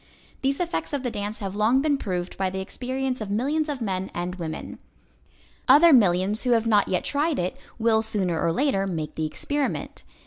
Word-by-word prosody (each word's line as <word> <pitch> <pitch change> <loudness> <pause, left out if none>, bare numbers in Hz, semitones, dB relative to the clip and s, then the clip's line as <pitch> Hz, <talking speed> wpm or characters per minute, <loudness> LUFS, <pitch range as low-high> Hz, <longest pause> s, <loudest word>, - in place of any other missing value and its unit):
These 275 +1 0
effects 345 -3 -2
of 280 -2 -1
the 245 - -2
dance 205 +1 -4
have 195 -1 -4
long 220 +5 +3
been 290 +1 +2
proved 180 -5 -3
by 190 -1 0
the 190 +1 -4
experience 255 +5 -3
of 210 - -4
millions 290 +9 0
of 280 -4 -4
men 190 -3 -2
and 175 +1 -3
women. 165 -4 -6 0.9
Other 300 +5 +7
millions 195 -2 +4
who 250 -2 +2
have 225 -1 +2
not 210 -3 +3
yet 180 - 0
tried 295 +2 0
it 180 +1 -2 0.2
will 225 -1 +3
sooner 195 -7 0
or 165 - +2
later 195 - +1
make 160 -5 -4
the 155 -1 -2
experiment. 285 - -3
220 Hz, 195 wpm, -25 LUFS, 185-270 Hz, 0.9 s, Other